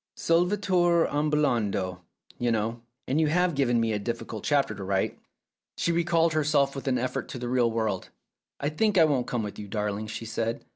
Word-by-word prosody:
"Solvitur 175 -1 +2
ambulando, 120 -12 0 0.4
you 120 - +1
know, 115 +1 -1 0.3
and 140 +5 +2
you 155 - +3
have 180 +3 +2
given 125 -4 +2
me 115 -1 +1
a 105 - -1
difficult 115 0 -5
chapter 140 -6 +2
to 100 -2 -7
write! 95 0 -1 0.3
" - - -65
She 170 - +1
recalled 170 -1 +2
herself 145 -3 +2
with 135 - -6
an 130 -1 +2
effort 125 +1 -2
to - - -6
the 120 0 -4
real 120 -1 +2
world. 110 -4 -2 0.5
"I 140 - 0
think 205 +6 +1
I 165 - +7
won't 135 -5 0
come 120 -3 -1
with 105 - -6
you, 105 - -7
darling," 105 +1 -2
she 115 +1 -6
said. 115 +1 -3
125 Hz, 195 wpm, -27 LUFS, 110-155 Hz, 0.5 s, I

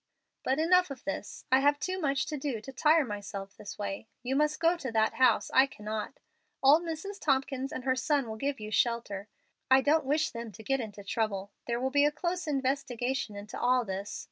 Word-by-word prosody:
"But 265 - +1
enough 360 +3 +4
of 275 -2 -8
this. 195 +1 -5
I 260 - +6
have 290 +1 +4
too 370 +4 -3
much 275 -3 +1
to 305 - -4
do 270 -5 -3
to 270 +5 -10
tire 305 +3 +4
myself 200 -2 -6
this 205 - -9
way. 200 +1 -4 0.2
You 255 +2 -1
must 300 +1 +2
go 335 +1 +4
to 270 -8 -5
that 220 -1 +2
house; 250 -4 +3
I 265 +1 +6
cannot. 215 0 -5 0.4
Old 290 +5 +7
Mrs. 345 +4 -5
Tompkins 270 -1 0
and 255 - -5
her 260 0 +2
son 280 -1 +1
will 220 - -5
give 275 +3 -2
you 215 0 -6
shelter. 215 -4 0 0.4
I 265 0 +7
don't 305 +3 +3
wish 300 +3 +1
them 230 -1 -6
to 220 - -11
get 270 +4 +1
into 210 -4 -6
trouble. 200 -1 -2 0.2
There 235 0 0
will 260 +1 -1
be 285 +1 +4
a 295 - +3
close 345 +3 -3
investigation 265 -4 -1
into 205 +1 -7
all 250 0 +3
this. 195 +1 -4
265 Hz, 210 wpm, -30 LUFS, 220-290 Hz, 0.4 s, Old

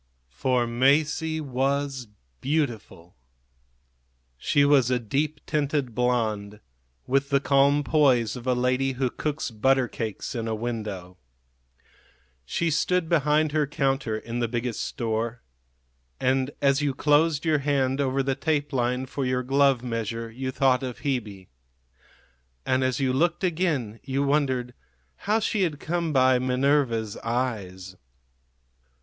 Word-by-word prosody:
For 120 - 0
Masie 150 +6 +1
was 135 -1 -1 0.3
beautiful. 120 - -3 1.2
She 140 - +2
was 140 -4 +4
a 125 - +2
deep 140 +7 -2
tinted 145 -4 -1
blonde, 110 -4 -1 0.5
with 135 +2 +1
the 140 -1 +3
calm 140 +1 +3
poise 130 -8 +3
of 125 0 -8
a 125 - +3
lady 125 +2 +1
who 130 -1 -1
cooks 150 -4 -3
butter 130 +3 +2
cakes 110 -4 -5
in 115 -2 -3
a 110 - -1
window. 105 -6 -5 1.3
She 170 - 0
stood 165 +2 +1
behind 150 -1 +2
her 150 -1 +1
counter 135 -5 -1
in 115 +2 -5
the 120 - 0
Biggest 120 0 -3
Store; 115 0 -3 0.8
and 130 +1 +1
as 140 +1 +3
you 140 -2 0
closed 150 +2 +2
your 155 -2 +2
hand 135 -1 0
over 135 0 0
the 135 0 0
tape 145 +1 -1
line 125 0 0
for 135 +1 -4
your 130 0 0
glove 135 -1 +3
measure 115 -1 -4
you 130 +3 -4
thought 130 -1 +2
of 125 -2 -6
Hebe; 105 -9 -3 1.2
and 130 0 +1
as 130 0 0
you 130 -2 +1
looked 170 +7 +1
again 155 - -1
you 135 0 -1
wondered 130 -4 0 0.6
how 215 - +4
she 215 -1 -1
had 160 -6 0
come 170 +1 -2
by 130 -2 +4
Minerva's 125 -4 +1
eyes. 100 -7 -3
130 Hz, 135 wpm, -25 LUFS, 120-145 Hz, 1.3 s, was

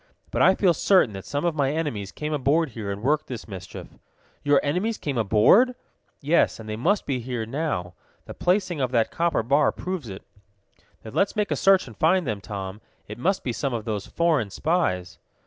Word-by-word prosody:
"But - - 0
I 190 - +6
feel 185 -4 +3
certain 180 - +3
that 95 -1 -8
some 145 +3 -2
of 170 - +1
my 140 -3 +1
enemies 120 - -3
came 150 0 -4
aboard 150 +3 +2
here 110 -4 -6
and 100 +2 -6
worked 150 +3 +1
this 120 -3 -7
mischief." 95 -4 -9 0.4
"Your 145 -1 +4
enemies 190 +10 -1
came 145 -3 -4
aboard?" 115 - +4 0.5
"Yes, 155 -2 +2
and 110 - -9
they 110 - -3
must 180 - +1
be 135 -3 -1
here 120 -2 -4
now. 115 - -3 0.3
The - - -8
placing 180 -4 0
of 130 - +1
that 115 -2 +2
copper 170 -7 0
bar 140 +5 +3
proves 180 - -5
it." 95 - -8 0.8
"Then 110 - -9
let's 200 - +1
make 210 -1 -1
a - - +2
search 195 -1 +4
and 115 -4 -12
find 175 - +2
them, 110 -5 -3
Tom. 95 +1 -6 0.3
It 105 +3 -8
must 190 +8 0
be 125 - -2
some 130 +2 -2
of 110 - -5
those 105 -3 -3
foreign 160 -11 +1
spies." 95 - -1
140 Hz, 200 wpm, -24 LUFS, 110-170 Hz, 0.8 s, I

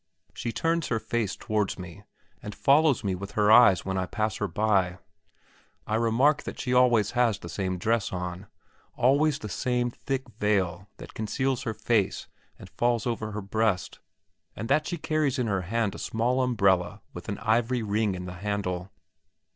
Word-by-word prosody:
She 115 - -4
turns 165 +7 0
her 115 - 0
face 110 -2 -2
towards 105 -2 -1
me 90 -3 -9 0.4
and 105 - -7
follows 140 -3 +3
me 100 -2 0
with 100 +2 -6
her 105 0 +3
eyes 110 -6 +7
when 95 0 -1
I 90 - -2
pass 110 0 -2
her 105 - -1
by 95 -1 +1 0.9
I 110 - -4
remark 120 +7 +3
that - - -7
she 125 -2 -1
always 120 -5 +4
has 120 -4 +2
the 85 - -10
same 95 0 -2
dress 110 +3 0
on, 90 +1 -5 0.5
always 145 +4 +3
the 110 - -7
same 120 +3 -1
thick 135 +1 -4
veil 95 -3 0
that - - -11
conceals 130 +4 -1
her 110 -4 -3
face 110 -4 0 0.3
and - - -11
falls 120 -2 0
over 110 -3 -3
her 105 - -4
breast, 105 -1 -1 0.6
and 110 - -5
that 155 0 +2
she 175 - -3
carries 155 -4 0
in 125 - 0
her 100 -4 0
hand 105 +3 -1
a - - -8
small 120 +3 0
umbrella 100 -8 +1
with - - -8
an - - -3
ivory 115 +2 +1
ring 105 -1 0
in 90 0 -6
the 90 - -6
handle. 100 -3 -2
110 Hz, 180 wpm, -27 LUFS, 100-125 Hz, 0.9 s, eyes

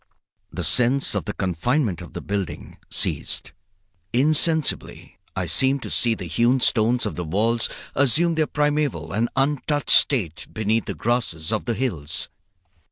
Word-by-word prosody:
The - - -4
sense 125 +3 +2
of 100 -6 -2
the - - -3
confinement 95 - -1
of 85 - -11
the - - -5
building 100 -2 -5
ceased. 65 - -2 0.6
Insensibly 155 +4 +2 0.2
I - - -1
seemed 135 +1 +2
to - - -6
see 115 -2 +2
the 95 - -7
hewn 120 +9 +2
stones 120 +1 +2
of 105 - -3
the 90 - -3
walls 110 +8 +1 0.2
assume 145 +6 +3
their 160 -1 +1
primeval 145 - -1
and 115 +3 0
untouched 145 +2 0
state 95 - +2
beneath 110 +1 0
the - - -4
grasses 115 -9 -1
of 110 - -1
the 120 - -1
hills. 80 - -2
120 Hz, 150 wpm, -23 LUFS, 100-140 Hz, 0.6 s, assume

